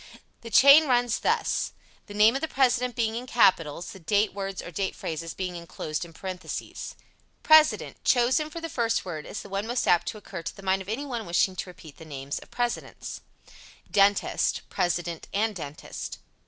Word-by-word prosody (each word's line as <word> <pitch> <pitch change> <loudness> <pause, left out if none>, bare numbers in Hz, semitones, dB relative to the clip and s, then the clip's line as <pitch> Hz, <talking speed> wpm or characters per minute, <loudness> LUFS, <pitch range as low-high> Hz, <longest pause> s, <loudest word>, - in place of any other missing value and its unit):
The 230 - -8
chain 280 +6 +8
runs 245 -2 +2
thus, - - 0 0.3
the 205 - -9
names 220 +5 +5
of - - -7
the 320 - -1
President 250 -3 +1
being 225 -2 0
in 245 +2 -5
capitals, 175 -8 +2
the 190 - -11
date 205 +5 +1
words 195 -1 -4
or 175 - -7
date 190 +3 -2
phrases 165 +1 -5
being 180 -2 -4
inclosed 165 -1 -5
in 170 - -10
parentheses: 185 +2 -6 0.5
President 310 -1 +4
Chosen 260 +5 +3
for 335 - -7
the 330 - -4
first 230 -8 0
word 155 -4 -6
as - - -6
the 200 - -12
one 195 +2 -3
most 240 +1 -1
apt 175 +3 +4
to 225 -1 -3
occur 195 -4 -8
to - - -6
the 195 - -12
mind 190 0 +1
of 190 - -9
anyone 240 -2 -3
wishing 180 +2 +2
to 185 - -4
repeat 160 -4 -13
the - - -11
names 140 -2 -5
of - - -15
the - - -20
Presidents. 240 -1 -3 0.7
Dentist 200 0 +2
President 175 -1 -2
and 215 +1 +1
dentist. 145 -4 -7
200 Hz, 190 wpm, -27 LUFS, 175-240 Hz, 0.7 s, chain